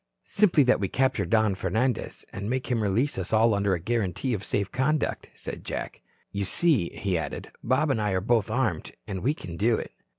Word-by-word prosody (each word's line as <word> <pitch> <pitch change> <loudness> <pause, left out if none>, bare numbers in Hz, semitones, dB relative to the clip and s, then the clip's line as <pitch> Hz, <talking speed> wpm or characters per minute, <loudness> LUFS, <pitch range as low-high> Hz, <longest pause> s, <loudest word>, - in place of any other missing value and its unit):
"Simply 185 -8 +4
that 125 - +3
we 100 - 0
capture 130 +5 +1
Don 110 -3 +3
Fernandez 110 +7 -1
and 100 +2 -4
make 130 +1 -2
him 115 -2 +1
release 105 +5 +1
us 90 - -4
all 110 +1 +4
under 100 -1 +2
a - - -4
guarantee 115 +4 -1
of 105 -2 -3
safe 100 -1 -1
conduct," 150 +4 0
said - - -7
Jack. - - -5 0.3
"You 100 0 -2
see," 130 - +2
he 95 -4 -1
added, 75 -3 -5
"Bob 135 +5 +2
and 110 - 0
I 105 -2 0
are 95 - +2
both 110 +1 +1
armed, 110 -8 -1
and 95 -2 -4
we 145 +4 +1
can 85 - -8
do 110 +4 +3
it." - - -5
110 Hz, 205 wpm, -27 LUFS, 95-130 Hz, 0.3 s, Simply